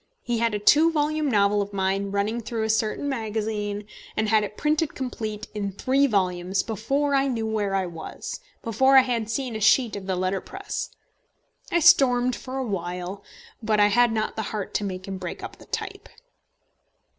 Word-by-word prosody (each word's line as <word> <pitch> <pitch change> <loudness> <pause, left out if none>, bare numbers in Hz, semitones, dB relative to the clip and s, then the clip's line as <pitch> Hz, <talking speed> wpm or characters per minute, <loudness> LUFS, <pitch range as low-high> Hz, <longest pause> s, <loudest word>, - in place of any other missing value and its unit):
He 240 -1 -1
had 230 -2 +1
a - - +1
two 300 +10 +5
volume 305 -1 0
novel 205 -2 +3
of 200 0 -5
mine 195 +1 0
running 205 +4 -1
through 225 0 -3
a 220 - +2
certain 220 +5 0
magazine, 215 -4 -2 0.3
and 220 0 +1
had 215 -1 +4
it 210 0 -6
printed 305 +1 0
complete 220 -5 -4
in 200 -2 -3
three 270 +7 +2
volumes 185 -3 0
before 270 +7 -1
I 275 0 +3
knew 230 -4 -1
where 210 -3 -1
I 190 -1 +1
was, 175 - -7 0.2
before 265 +4 +4
I - - +10
had 235 -4 -2
seen 250 0 -2
a - - -3
sheet 230 +2 +4
of 195 -1 -7
the 190 - 0
letterpress. 190 - -3 0.8
I 345 - +2
stormed 250 -4 +5
for 260 +1 -6
a 265 - -1
while, 180 -1 -4 0.4
but 215 -1 +1
I 205 0 +6
had 240 +2 +4
not 215 -1 -1
the 220 - -2
heart 210 -3 -4
to - - 0
make 185 -1 -5
him 195 -1 -5
break 180 -2 -6
up - - -7
the - - -15
type. - - -5
220 Hz, 190 wpm, -25 LUFS, 200-255 Hz, 0.8 s, I